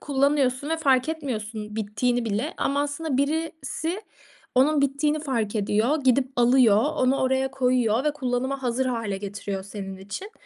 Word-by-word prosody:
kullanıyorsun 280 0 +1
ve 325 - +1
fark 270 -2 +2
etmiyorsun 220 -8 -5
bittiğini 235 +3 0
bile 225 +8 -2
ama 280 +1 +1
aslında 290 0 -2
birisi 320 +4 -2 0.5
onun 285 +3 +4
bittiğini 295 +2 +1
fark 230 -7 -2
ediyor, 215 +8 +1
gidip 255 0 +3
alıyor, 240 -3 +5 0.2
onu 255 +1 +2
oraya 265 0 +1
koyuyor 250 -2 +1
ve 300 - +2
kullanıma 265 0 -2
hazır 250 +1 0
hâle 230 -5 -2
getiriyor 200 -1 -5
senin 195 -1 -7
için. 200 - -7
260 Hz, 145 wpm, -25 LUFS, 225-285 Hz, 0.5 s, alıyor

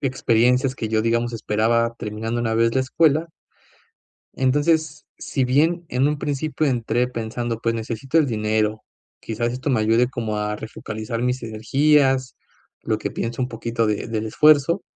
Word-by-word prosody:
experiencias 125 0 +2
que 110 -3 -4
yo, 110 0 +1
digamos, 115 +1 0
esperaba 115 +1 0
terminando 110 +2 -3
una 115 -1 -1
vez 115 +1 +2
la 130 - +3
escuela. 155 +4 +2 1.1
Entonces, 145 +4 +1
si 130 -3 -1
bien 165 +7 +2
en 130 +3 +2
un 150 0 -1
principio 150 +2 -2
entré 125 -2 0
pensando: 115 -1 -4
"Pues 115 0 0
necesito 115 +6 -2
el 155 - +4
dinero, 110 -2 -1 0.4
quizás 120 +2 -3
esto 130 +3 -3
me 125 -5 +2
ayude 115 +3 +3
como 115 -5 -3
a 105 0 -2
refocalizar 110 +1 -6
mis 125 0 -1
energías", 130 +4 +2 0.5
lo - - -1
que - - -4
pienso 120 +2 -3
un - - -2
poquito 115 -1 -2
de 105 +1 -1
del 110 -1 -3
esfuerzo, 150 - +4
120 Hz, 155 wpm, -22 LUFS, 110-135 Hz, 1.1 s, el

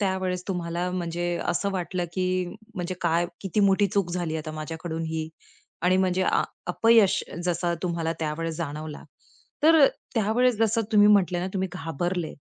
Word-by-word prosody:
त्यावेळेस 190 -2 -1
तुम्हाला 175 -1 -2
म्हणजे 175 -1 -2 0.2
असं 200 +3 0
वाटलं, 180 -1 -2
की 185 0 0 0.3
म्हणजे 180 -1 -3
काय 170 0 +2
किती 195 +1 -1
मोठी 200 0 +4
चूक 195 -2 0
झाली 170 -2 -2
आता 155 0 -5
माझ्याकडून 160 +1 -5
ही? 160 0 -3 0.5
आणि 180 +1 +4
म्हणजे 185 0 +2
अ, - - +2 0.2
अपयश 220 +2 +4 0.2
जसं 175 0 0
तुम्हाला 170 -2 -1
त्यावेळेस 160 +1 -3
जाणवला, 155 -2 -5 0.6
तर 320 +1 +6
अ, 280 - +9 0.3
त्यावेळेस 230 +2 +2
जसं 225 0 +2
तुम्ही 210 -1 +7
म्हटले 190 -4 +4
ना 180 - -2
तुम्ही 190 0 -1
घाबरले 175 +2 -3
180 Hz, 155 wpm, -26 LUFS, 165-195 Hz, 0.6 s, अ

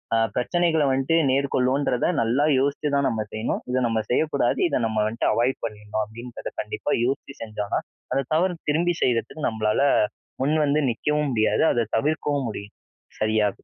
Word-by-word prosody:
ஆ - - +4 0.2
பிரச்சனைகள 160 +4 +1
வந்ட்டு 135 +5 +1
மேற்கொள்வோன்றத 130 -1 +1
நல்லா 130 +5 +2
யோசிச்சு 140 +2 0
தான் 140 -1 +2
நம்ம 110 -2 -2
செய்யணும், 110 +2 -2
இத 125 - 0
நம்ம 110 -1 0
செய்யக்கூடாது, 140 -1 +1
இத 145 - 0
நம்ம 110 -1 0
வந்ட்டு 115 +2 -2
அவாய்ட் 120 +4 +1
பண்ணிர்ணும் 105 0 -4
அப்பிடின்றத 115 +3 -8
கண்டிப்பா - - -4
யோசிச்சு 135 +1 -3
செஞ்சோன்னா, 105 -2 -2 0.3
அந்த 135 +1 +1
தவற 175 +1 +1
திரும்பி 170 +3 +2
செய்யிறதுக்கு 125 +5 0
நம்மளால 110 +2 0 0.6
முன்வந்து 150 +1 +2
நிக்கவும் 150 +5 0
முடியாது, 110 +7 +2
அத 115 -3 0
தவிர்க்கவும் 145 0 0
முடியும். 105 -1 -8 0.4
சரியா? 110 -1 +2
130 Hz, 145 wpm, -24 LUFS, 110-145 Hz, 0.6 s, ஆ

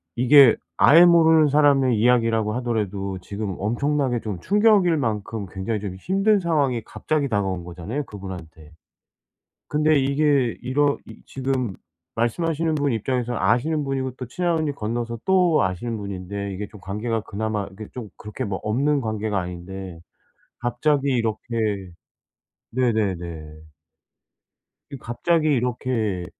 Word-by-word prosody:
이게 130 0 +7 0.2
아예 170 +4 +7
모르는 160 -3 +5
사람의 135 -4 +4
이야기라고 115 -2 +2
하더라도 100 -6 -2
지금 100 0 -5
엄청나게 125 +3 0
좀 105 -5 -5
충격일 205 -5 +4
만큼 110 -4 -2
굉장히 100 +3 -3
좀 95 -3 -5
힘든 195 - +2
상황이 145 -9 0
갑자기 150 -3 -2
다가온 95 -5 -1
거잖아요 90 - -5
그분한테. 85 -6 -10 1.0
근데 150 0 +3
이게 140 -3 +1
이러 140 +3 +1
이 - - -13
지금 130 -5 -2 0.4
말씀하시는 160 +7 0
분 145 -4 0
입장에서는 120 +1 -2
아시는 145 - +1
분이고 135 -1 -2
또 130 - -5
친한 170 +5 0
언니 155 -2 -1
건너서 115 -1 -4
또 180 -4 +4
아시는 95 +6 -2
분인데 100 0 -5
이게 100 +2 -5
좀 105 - -12
관계가 110 +4 -2
그나마 105 -1 -3
이게 105 +2 -9
좀 115 -5 -7
그렇게 105 0 -6
뭐 95 -2 -3
없는 140 +7 +1
관계가 110 -3 -2
아닌데 90 0 -7 0.6
갑자기 140 +4 0
이렇게 110 -5 -2 0.8
네네네. 90 -11 -2 1.3
이 140 - -6
갑자기 155 +7 0
이렇게 120 -7 -1
120 Hz, 305 characters per minute, -23 LUFS, 100-140 Hz, 1.3 s, 이게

